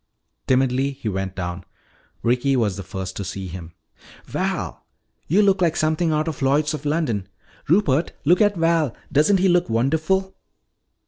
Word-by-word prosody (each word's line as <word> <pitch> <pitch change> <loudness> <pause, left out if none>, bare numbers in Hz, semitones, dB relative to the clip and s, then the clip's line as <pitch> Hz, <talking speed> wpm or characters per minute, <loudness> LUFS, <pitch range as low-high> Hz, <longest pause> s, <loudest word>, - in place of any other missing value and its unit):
Timidly 130 +1 +2
he 125 - -7
went 95 -1 -3
down. 90 -1 -4 0.6
Ricky 125 +3 +2
was 110 -6 +1
the 100 - -6
first 95 0 -6
to 100 - -3
see 95 +1 -5
him. 85 -2 -8 0.5
"Val! - - -3 0.4
You 195 +7 +4
look 195 -2 +3
like 170 -2 +2
something 155 +1 +1
out 155 +1 0
of 160 - -4
Lloyds 145 +3 +2
of 150 -1 -6
London. 145 - -1 0.4
Rupert, 160 -4 +2
look 175 +6 +4
at 205 -1 +4
Val. 165 -5 +1 0.2
Doesn't 155 +7 +4
he 190 +1 +2
look 175 -7 +2
wonderful?" 160 +11 0
140 Hz, 155 wpm, -22 LUFS, 105-165 Hz, 0.6 s, You